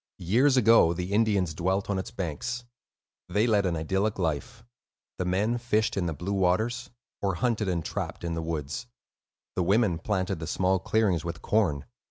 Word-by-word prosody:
Years 125 +10 +3
ago, 115 -8 +6
the 90 +3 -4
Indians 100 -6 +2
dwelt 95 +5 0
on 100 -2 0
its 95 - -5
banks. 95 - -4 0.6
They 105 +5 +2
led 105 -5 +3
an 85 - 0
idyllic 95 +7 0
life: 95 - -2 0.6
the 90 - 0
men 105 +7 +1
fished 110 -1 +1
in 95 -3 0
the 80 - -1
blue 90 +7 -3
waters, 110 +6 +1 0.3
or 95 -2 0
hunted 110 -2 0
and 85 -3 -1
trapped - - -4
in 85 -1 -2
the 80 - -2
woods; 80 - -4 0.7
the - - +1
women 95 -1 +2
planted 95 -2 -1
the 80 - -5
small 95 +1 +1
clearings 95 -6 +1
with 85 -1 -6
corn. 85 -10 +1
95 Hz, 175 wpm, -27 LUFS, 85-110 Hz, 0.7 s, ago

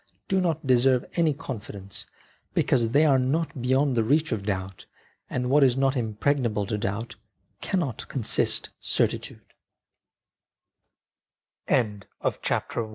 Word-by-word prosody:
do 190 -1 +2
not 160 -4 -1
deserve 130 0 +3
any 165 -3 +2
confidence, 105 -8 -7 0.5
because 120 -4 +2
they 145 +6 +4
are 135 -3 +4
not 140 +1 -1
beyond 130 +3 +2
the 115 - +2
reach 150 +6 +2
of 110 -4 -1
doubt, 95 -1 -4 0.4
and 125 0 -2
what 145 +1 +6
is 130 -1 +4
not 135 0 +2
impregnable 115 -1 0
to 105 +2 -2
doubt 105 +3 -3 0.4
cannot 160 - -1
constitut 125 -6 0
130 Hz, 105 wpm, -26 LUFS, 110-145 Hz, 0.5 s, what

